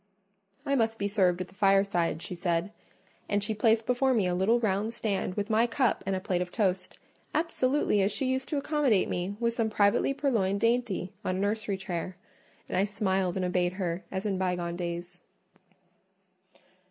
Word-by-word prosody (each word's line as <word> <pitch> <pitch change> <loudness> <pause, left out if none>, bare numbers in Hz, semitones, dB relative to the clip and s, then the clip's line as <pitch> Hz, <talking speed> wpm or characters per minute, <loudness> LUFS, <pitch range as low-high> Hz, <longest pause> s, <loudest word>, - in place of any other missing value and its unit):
I 280 - 0
must 225 -4 +1
be 200 - -1
served 185 -3 +2
at 185 - -4
the - - -19
fireside, 195 -5 +2
she 180 - -5
said; 175 +1 -1 0.6
and 205 0 +1
she 220 - 0
placed 220 +1 +2
before 255 +1 +2
me 210 -5 +2
a 180 - 0
little 195 +7 +3
round 215 +1 0
stand 195 -5 -2
with 205 -1 -2
my 225 +1 +3
cup 245 0 +1
and 195 - +1
a - - -1
plate 185 -1 -1
of 180 0 -4
toast, 185 -4 -1 0.4
absolutely 290 -8 +1
as 195 +2 +2
she 210 +6 -2
used 260 +1 -1
to 300 - -1
accommodate 280 -8 +2
me 180 +3 -2
with 235 -1 +1
some 230 -2 0
privately 205 +4 +3
purloined 205 -9 +1
dainty 230 -5 0
on 185 - -1
a - - -2
nursery 205 0 -1
chair: 185 -1 -5 0.5
and - - -4
I 190 - +4
smiled 195 -3 0
and 185 -1 -1
obeyed 180 0 +1
her 185 -2 -3
as 190 +2 -3
in 195 -3 -1
bygone 175 -2 -1
days. 175 0 -5
200 Hz, 185 wpm, -29 LUFS, 185-225 Hz, 0.6 s, I